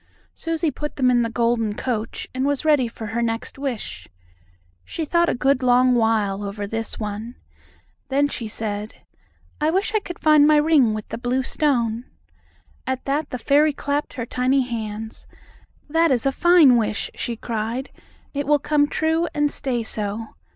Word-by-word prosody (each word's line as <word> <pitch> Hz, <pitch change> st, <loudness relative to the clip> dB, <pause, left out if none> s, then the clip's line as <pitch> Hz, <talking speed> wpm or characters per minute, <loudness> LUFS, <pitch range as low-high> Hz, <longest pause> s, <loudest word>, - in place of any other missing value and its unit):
Susie 330 Hz, -1 st, -1 dB
put 295 Hz, +3 st, -6 dB
them 255 Hz, -2 st, +3 dB
in 240 Hz, -1 st, +3 dB
the 230 Hz, -, 0 dB
golden 230 Hz, -2 st, 0 dB
coach, 230 Hz, -3 st, -3 dB
and 260 Hz, +1 st, -2 dB
was 285 Hz, +1 st, 0 dB
ready 295 Hz, -5 st, +4 dB
for 225 Hz, -1 st, -8 dB
her 225 Hz, +3 st, -2 dB
next 230 Hz, +3 st, -3 dB
wish. 210 Hz, -, -4 dB, 0.8 s
She 320 Hz, -, -4 dB
thought 340 Hz, +2 st, +2 dB
a -, -, 0 dB
good 265 Hz, +1 st, +2 dB
long 250 Hz, 0 st, +4 dB
while 220 Hz, -4 st, +1 dB
over 205 Hz, +1 st, -4 dB
this 225 Hz, +2 st, -4 dB
one. 215 Hz, +3 st, -5 dB, 0.7 s
Then 280 Hz, +1 st, +2 dB
she 235 Hz, -5 st, -5 dB
said: 210 Hz, 0 st, -5 dB, 0.6 s
"I 305 Hz, -, +3 dB
wish 385 Hz, +5 st, 0 dB
I 435 Hz, -, +3 dB
could 350 Hz, -4 st, -8 dB
find 305 Hz, -1 st, +5 dB
my 305 Hz, -, +5 dB
ring 295 Hz, -7 st, +4 dB
with 215 Hz, -, -6 dB
the 230 Hz, -, -5 dB
blue 250 Hz, +2 st, 0 dB
stone!" 240 Hz, -5 st, 0 dB, 0.8 s
At 260 Hz, -1 st, -2 dB
that 285 Hz, +2 st, -1 dB
the 255 Hz, -, -4 dB
fairy 290 Hz, +5 st, +3 dB
clapped 285 Hz, +1 st, -2 dB
her 245 Hz, -4 st, -4 dB
tiny 255 Hz, +3 st, +1 dB
hands. 225 Hz, -3 st, -5 dB, 0.6 s
"That 325 Hz, +2 st, +3 dB
is 255 Hz, -3 st, +1 dB
a 275 Hz, -, +3 dB
fine 325 Hz, -5 st, +6 dB
wish!" 215 Hz, -2 st, -1 dB
she 235 Hz, -, -3 dB
cried. 230 Hz, +3 st, -4 dB, 0.4 s
"It 285 Hz, -1 st, -3 dB
will 295 Hz, 0 st, +5 dB
come 290 Hz, 0 st, +2 dB
true, 320 Hz, +3 st, 0 dB
and 295 Hz, -1 st, +2 dB
stay 245 Hz, -4 st, -2 dB
so. 215 Hz, 0 st, -3 dB
255 Hz, 170 wpm, -22 LUFS, 225-290 Hz, 0.8 s, fine